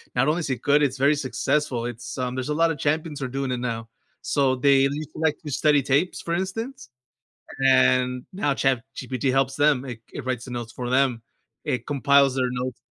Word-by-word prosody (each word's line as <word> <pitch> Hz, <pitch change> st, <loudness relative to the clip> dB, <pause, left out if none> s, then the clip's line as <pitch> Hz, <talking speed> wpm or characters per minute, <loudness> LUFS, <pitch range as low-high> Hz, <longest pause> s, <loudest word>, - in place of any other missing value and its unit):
Not 125 Hz, +2 st, +2 dB
only 155 Hz, +3 st, +2 dB
is 155 Hz, -, -4 dB
it 130 Hz, -, -2 dB
good, 145 Hz, +1 st, +3 dB
it's 135 Hz, -2 st, 0 dB
very 140 Hz, +3 st, +4 dB
successful, 135 Hz, -2 st, -1 dB
it's, 120 Hz, +2 st, -6 dB
um 125 Hz, -1 st, -2 dB
there's 130 Hz, +2 st, -3 dB
a -, -, +1 dB
lot 165 Hz, +2 st, +3 dB
of 155 Hz, -, -4 dB
champions 155 Hz, +1 st, -1 dB
who 135 Hz, -, -3 dB
are -, -, -4 dB
doing 135 Hz, 0 st, -3 dB
it 125 Hz, -, -2 dB
now, 115 Hz, -2 st, -4 dB, 0.3 s
so, 135 Hz, -3 st, +2 dB
they 135 Hz, +1 st, +4 dB
used 140 Hz, +2 st, -1 dB
to -, -, -9 dB
like 160 Hz, -1 st, +2 dB
to 150 Hz, -, -6 dB
study 145 Hz, +1 st, +3 dB
tapes, 140 Hz, +7 st, 0 dB
for 170 Hz, 0 st, -2 dB
instance, 225 Hz, -, -4 dB, 0.8 s
and 125 Hz, -1 st, +3 dB
now 185 Hz, -7 st, 0 dB
ChatGPT 135 Hz, 0 st, -1 dB
helps 135 Hz, 0 st, +1 dB
them, 145 Hz, -2 st, +3 dB
it 120 Hz, -3 st, -7 dB
c -, -, -10 dB
it 135 Hz, -, -7 dB
writes 125 Hz, -2 st, -2 dB
the 130 Hz, -, -9 dB
notes 120 Hz, -2 st, -5 dB
for 120 Hz, +2 st, -5 dB
them. 130 Hz, -2 st, +2 dB, 0.4 s
it 125 Hz, -2 st, -2 dB
compiles 140 Hz, -1 st, +3 dB
their 130 Hz, -1 st, +1 dB
notes 125 Hz, 0 st, -4 dB
135 Hz, 220 wpm, -24 LUFS, 125-145 Hz, 0.8 s, very